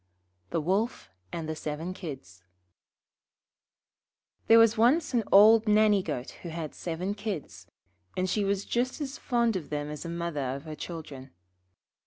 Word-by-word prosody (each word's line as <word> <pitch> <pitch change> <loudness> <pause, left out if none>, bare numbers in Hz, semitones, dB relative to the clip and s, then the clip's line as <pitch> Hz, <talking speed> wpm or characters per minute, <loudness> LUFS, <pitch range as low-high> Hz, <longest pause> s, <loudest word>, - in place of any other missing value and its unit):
The - - 0
Wolf 195 - -1 0.2
and 165 -2 -4
the 160 - -3
Seven 155 +4 -4
Kids 130 - -9 2.0
There 225 - +8
was 230 -1 +6
once 260 +8 +3
an 235 -2 +2
old 215 +3 +7
Nanny 210 -1 +4
goat 145 -8 -4
who 175 - -6
had 160 -2 -5
seven 180 +3 -3
Kids, 170 - -6 0.5
and 185 0 +1
she 205 +3 0
was 200 0 -1
just 250 +4 -1
as 280 -2 -5
fond 235 -3 +1
of 175 -6 -4
them 150 0 -3
as 150 - -6
a 170 - -6
mother 160 -6 -3
of 140 - -8
her 155 -1 -7
children. 150 -4 -8
180 Hz, 155 wpm, -28 LUFS, 150-215 Hz, 2.0 s, There